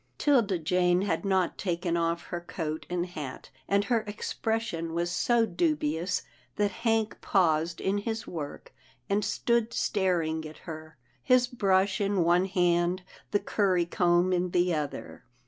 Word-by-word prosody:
" - - -43
'Tilda 235 -10 +3
Jane 180 +2 +2
had 175 -3 -1
not 190 -3 +1
taken 175 -2 -1
off 170 0 0
her 175 - -2
coat 160 -2 -5
and 175 0 -1
hat, 150 -7 -8 0.2
and 200 0 +2
her 230 +3 +2
expression 205 -5 -3
was 175 +1 0
so 235 +6 +2
dubious 165 -2 0 0.3
that 205 -1 +1
Hank 225 +1 0
paused 165 -3 +2
in 200 +1 0
his 225 +1 -3
work, 150 -4 -7 0.4
and 205 +1 +2
stood 235 +2 0
staring 170 -6 0
at 155 - -12
her, 160 -1 -8 0.2
his 250 - +4
brush 195 -5 +1
in 200 -3 +2
one 175 +2 +3
hand, 175 -1 +1 0.3
the 205 - +2
curry 185 -5 +1
comb 175 +1 +2
in 180 0 +1
the 175 0 +2
other. 150 -4 -4
180 Hz, 150 wpm, -28 LUFS, 170-205 Hz, 0.4 s, his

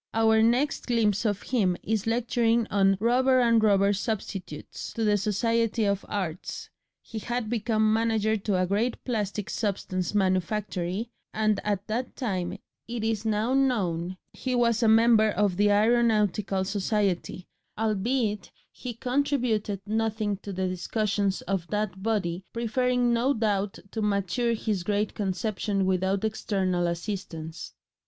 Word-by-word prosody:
Our 220 0 +4
next 245 +6 +1
glimpse 225 -3 +1
of 205 -1 0
him 195 -8 +1
is 220 0 -1
lecturing 230 0 +2
on 195 -1 +3
"rubber 255 +4 +3
and 230 -2 +4
rubber 200 -1 +4
substitutes," 195 -6 -5
to 225 - -2
the 210 -1 +3
Society 225 +2 +1
of 200 -1 0
Arts 185 -5 -4 0.3
he 225 - -6
had 240 0 -3
become 220 -1 +2
manager 220 -1 +1
to 200 -2 0
a 185 - +2
great 210 +6 -1
plastic 210 -4 -2
substance 190 -3 -2
manufactory 190 +2 -1 0.2
and 215 -1 +2
at 200 -2 -1
that 235 +3 -3
time, 185 -6 -2 0.3
it 235 -1 -4
is 225 -1 -1
now 220 +3 +1
known, 185 -10 0 0.2
he 255 -1 -2
was 235 -1 +2
a 230 - +4
member 220 0 +5
of 205 -3 +1
the 205 +2 +3
Aeronautical 210 -3 +2
Society, 195 -2 -1 0.3
albeit 215 0 0 0.2
he 245 -3 -7
contributed 245 -6 0
nothing 220 -1 -1
to 200 +1 -8
the 190 0 -1
discussions 200 +2 -1
of 190 -3 -2
that 210 -2 -2
body, 190 -5 -1
preferring 245 +1 +1
no 250 +4 +2
doubt 205 -3 0
to 220 - -3
mature 210 +3 0
his 215 -4 -1
great 205 +3 -1
conception 195 0 -1
without 190 +1 +1
external 190 -5 0
assistance. 170 -2 -5
210 Hz, 135 wpm, -27 LUFS, 195-230 Hz, 0.3 s, member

